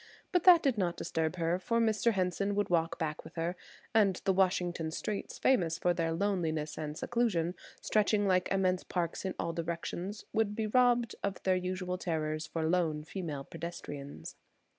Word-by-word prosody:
But 360 Hz, -3 st, +2 dB
that 350 Hz, -3 st, +8 dB
did 265 Hz, -7 st, +2 dB
not 175 Hz, -2 st, 0 dB
disturb 160 Hz, +1 st, -1 dB
her 170 Hz, +1 st, 0 dB
for 230 Hz, +5 st, 0 dB
Mr. 225 Hz, 0 st, +2 dB
Henson 195 Hz, +1 st, 0 dB
would 205 Hz, -2 st, 0 dB
walk 165 Hz, -1 st, +1 dB
back 155 Hz, -2 st, -3 dB
with -, -, -13 dB
her, 170 Hz, +2 st, -1 dB, 0.4 s
and 205 Hz, -4 st, +4 dB
the 195 Hz, -, +4 dB
Washington 180 Hz, -3 st, +1 dB
streets, 200 Hz, +5 st, -4 dB
famous 170 Hz, -11 st, +2 dB
for 175 Hz, +1 st, +2 dB
their 165 Hz, -1 st, 0 dB
loneliness 165 Hz, -4 st, -1 dB
and 150 Hz, 0 st, -5 dB
seclusion, 205 Hz, -9 st, 0 dB, 0.3 s
stretching 210 Hz, -1 st, +2 dB
like 185 Hz, -2 st, +2 dB
immense 185 Hz, -1 st, +2 dB
parks 175 Hz, +1 st, -2 dB
in 190 Hz, -, -2 dB
all 165 Hz, -, -2 dB
directions, 170 Hz, +4 st, -4 dB
would 215 Hz, -2 st, +1 dB
be 220 Hz, 0 st, -1 dB
robbed 240 Hz, +1 st, +3 dB
of 200 Hz, -2 st, -3 dB
their 185 Hz, -1 st, +3 dB
usual 180 Hz, 0 st, -2 dB
terrors 155 Hz, -2 st, -2 dB
for 160 Hz, -1 st, -2 dB
lone 160 Hz, -3 st, +1 dB
female 155 Hz, -5 st, -5 dB
pedestrians. 145 Hz, -, -7 dB
180 Hz, 170 wpm, -32 LUFS, 165-205 Hz, 0.4 s, that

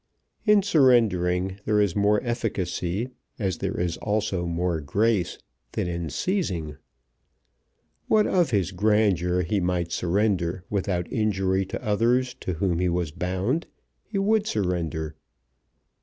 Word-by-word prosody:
In 210 Hz, -1 st, +6 dB
surrendering 100 Hz, -, +3 dB
there 105 Hz, -1 st, +2 dB
is 100 Hz, -4 st, +2 dB
more 105 Hz, +1 st, +3 dB
efficacy, 110 Hz, -2 st, -2 dB, 0.3 s
as 95 Hz, -7 st, -2 dB
there -, -, -2 dB
is 85 Hz, -1 st, -1 dB
also 100 Hz, -4 st, -1 dB
more 85 Hz, -1 st, -1 dB
grace, 100 Hz, +5 st, +1 dB, 0.4 s
than -, -, -1 dB
in 85 Hz, -2 st, -3 dB
seizing. 85 Hz, -, -2 dB, 1.3 s
What 215 Hz, -1 st, +4 dB
of 175 Hz, -5 st, +2 dB
his 100 Hz, -6 st, +1 dB
grandeur 95 Hz, -3 st, +2 dB
he 100 Hz, +5 st, 0 dB
might 90 Hz, -2 st, -1 dB
surrender 90 Hz, 0 st, 0 dB
without 95 Hz, -3 st, -1 dB
injury 95 Hz, -3 st, +1 dB
to 120 Hz, -, -6 dB
others 120 Hz, +4 st, +2 dB
to 90 Hz, -, -3 dB
whom 85 Hz, 0 st, 0 dB
he 90 Hz, 0 st, +2 dB
was 85 Hz, -3 st, -1 dB
bound, 95 Hz, -, -1 dB, 0.4 s
he 210 Hz, -, -5 dB
would 210 Hz, +2 st, +2 dB
surrender. 85 Hz, -6 st, -1 dB
95 Hz, 125 wpm, -25 LUFS, 90-110 Hz, 1.3 s, In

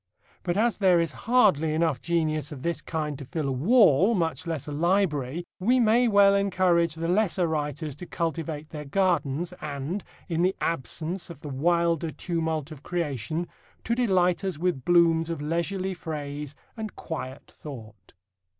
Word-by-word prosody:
But 175 Hz, +1 st, -1 dB
as 225 Hz, +1 st, +2 dB
there 185 Hz, -4 st, +5 dB
is 165 Hz, -1 st, 0 dB, 0.2 s
hardly 180 Hz, -, +4 dB
enough 160 Hz, -6 st, +1 dB
genius 155 Hz, -2 st, 0 dB
of 135 Hz, -3 st, -8 dB
this 170 Hz, 0 st, -1 dB
kind 150 Hz, -3 st, -3 dB
to 140 Hz, -, -7 dB
fill 155 Hz, +2 st, -3 dB
a -, -, 0 dB
wall, 195 Hz, -, +5 dB
much 165 Hz, -1 st, -1 dB
less 160 Hz, -5 st, -3 dB
a -, -, -4 dB
library, 165 Hz, -2 st, 0 dB
we 245 Hz, +7 st, +3 dB
may 235 Hz, +1 st, +4 dB
well 200 Hz, -2 st, +6 dB
encourage 185 Hz, -4 st, +2 dB
the 165 Hz, +1 st, -3 dB
lesser 185 Hz, -1 st, +2 dB
writers 150 Hz, -2 st, -3 dB
to 175 Hz, -, -8 dB
cultivate 160 Hz, -2 st, -3 dB
their 150 Hz, -2 st, -6 dB
gardens, 170 Hz, -1 st, 0 dB
and, 150 Hz, +6 st, -4 dB, 0.2 s
in 165 Hz, -1 st, -1 dB
the 185 Hz, +2 st, +2 dB
absence 165 Hz, +5 st, -3 dB
of 165 Hz, -4 st, -10 dB
the 150 Hz, -, -7 dB
wilder 170 Hz, +3 st, +1 dB
tumult 160 Hz, -2 st, -2 dB
of 150 Hz, -3 st, -10 dB
creation, 160 Hz, -1 st, -2 dB, 0.4 s
to 230 Hz, -, 0 dB
delight 185 Hz, -7 st, +2 dB
us 190 Hz, -5 st, -2 dB
with 170 Hz, -5 st, -1 dB
blooms 165 Hz, -2 st, +4 dB
of 165 Hz, -, -3 dB
leisurely 170 Hz, +5 st, -1 dB
phrase 150 Hz, -4 st, -6 dB, 0.2 s
and 220 Hz, -3 st, -6 dB
quiet 135 Hz, -4 st, -6 dB
thought. 110 Hz, -, -11 dB
165 Hz, 160 wpm, -26 LUFS, 150-185 Hz, 0.4 s, well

